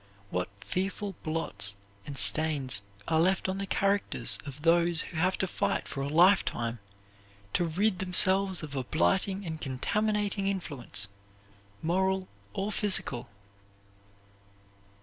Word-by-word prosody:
What 90 0 -1
fearful 195 +2 -2
blots 100 -12 -3 0.3
and 140 - -6
stains 140 -9 +3 0.3
are 160 - +2
left 185 +3 +2
on 190 +1 -2
the 195 - -3
characters 200 +1 +1
of 140 +1 -8
those 170 0 +3
who 165 - -8
have 185 +3 +2
to - - 0
fight 185 - -1
for 135 - -5
a 140 - -1
lifetime 150 - +3 0.7
to 175 - +2
rid 185 +4 +1
themselves 190 0 +3
of 145 -2 -7
a 130 - -1
blighting 190 - +1
and 160 -2 -5
contaminating 205 +9 -1
influence, 145 - -1 0.8
moral 190 +3 +1 0.3
or 200 - -2
physical! 190 - +2
175 Hz, 125 wpm, -29 LUFS, 140-195 Hz, 0.8 s, stains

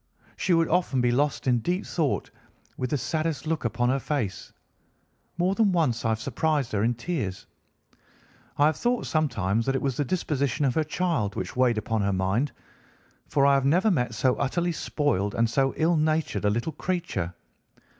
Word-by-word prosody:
She 180 - +1
would 165 -1 +3
often 170 -6 +1
be 120 -1 +3
lost 145 +4 0
in 125 -2 +3
deep 180 - -1
thought, 155 -5 -1 0.4
with 125 - -3
the 145 - 0
saddest 155 -2 -2
look 160 0 -1
upon 120 +2 +1
her 135 +2 +1
face. 120 -9 -3 0.9
More 180 +2 +2
than 210 -1 +3
once 150 -10 +1
I - - +2
have 110 0 0
surprised 140 +1 -1
her 105 -1 0
in 120 +2 +1
tears. 120 - -4 1.1
I 145 - +5
have 155 0 +2
thought 245 0 0
sometimes 115 - 0
that 135 - +1
it 135 - 0
was 135 -3 -1
the 145 - +1
disposition 145 -3 -1
of 130 - +2
her 160 - +1
child 155 - -1
which 95 -1 -4
weighed 125 -3 +3
upon 110 0 -1
her 100 0 +1
mind, 95 +9 0 0.8
for 140 -1 +2
I 140 - +5
have 135 -1 +3
never 180 +9 +3
met 125 - 0
so 125 +3 +2
utterly 175 +6 0
spoiled 145 - -1
and 115 0 +3
so 135 +3 +1
ill 165 +2 +3
natured 155 -6 0
a - - +4
little 120 +9 -1
creature. 160 - -3
140 Hz, 185 wpm, -26 LUFS, 115-160 Hz, 1.1 s, I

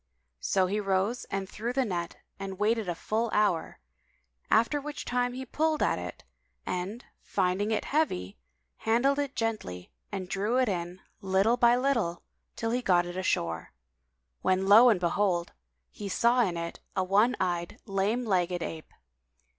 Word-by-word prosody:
So 190 -1 +2
he 200 +3 -1
rose 195 +4 0
and 195 -1 -3
threw 230 +5 -4
the 265 0 +1
net 175 -5 -3 0.2
and 195 -1 -5
waited 215 -1 +1
a 175 - -1
full 225 +6 -1
hour, 205 -6 +1 0.7
after 235 +6 +3
which 295 +1 -6
time 245 0 0
he 260 +1 -5
pulled 310 +4 0
at - - +1
it 90 0 -7 0.4
and, 190 +7 -4 0.2
finding 185 +3 0
it 220 - 0
heavy, 185 - -1 0.4
handled 265 +6 +2
it 285 -1 -2
gently 210 - -3 0.2
and 190 -2 -4
drew 200 +6 0
it 260 -1 +3
in, 180 -1 -3 0.2
little 195 +4 +3
by 240 0 +5
little, 240 -10 0 0.3
till 225 0 -2
he 250 +1 0
got 175 -6 +3
it 175 0 -6
ashore, 85 - -1 0.7
when 185 +1 +2
lo 220 +5 +8
and 210 -6 +3
behold! 175 -1 +1 0.4
he 200 - -6
saw 235 +5 +3
in 180 -7 0
it 170 0 -5 0.2
a 185 - +2
one 210 +7 +3
eyed, 175 -2 -2
lame 205 +4 0
legged 180 -4 +1
ape. 160 -1 -7
200 Hz, 160 wpm, -29 LUFS, 180-235 Hz, 0.7 s, lo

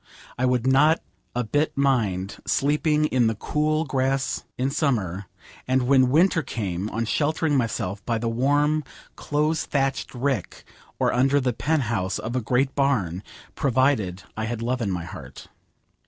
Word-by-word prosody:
I 130 +1 +1
would 125 -1 +1
not 145 +5 +4 0.4
a 125 - 0
bit 145 +7 0
mind 105 -9 0
sleeping 150 +2 +2
in 125 -5 +2
the 110 - 0
cool 155 +7 0
grass 135 -1 -1
in 130 +2 0
summer, 100 - -1 0.4
and 130 0 +2
when 130 0 +4
winter 165 +4 +4
came 100 - -3
on 115 +1 -2
sheltering 150 +5 0
myself 105 -5 -1
by 115 -1 -1
the 115 +1 -2
warm 145 +6 +2 0.3
close 150 +2 0
thatched 135 -2 -1
rick, 125 - -2 0.3
or - - +1
under 135 +3 +3
the 125 -2 0
penthouse 115 -10 -1
of 120 +3 -5
a 130 - +1
great 130 +4 +1
barn, 105 - 0 0.3
provided 130 - +1
I 110 - -2
had 115 0 -4
love 125 +1 -1
in 105 - -1
my 90 -3 -3
heart. 85 - -10
130 Hz, 155 wpm, -24 LUFS, 110-145 Hz, 0.4 s, not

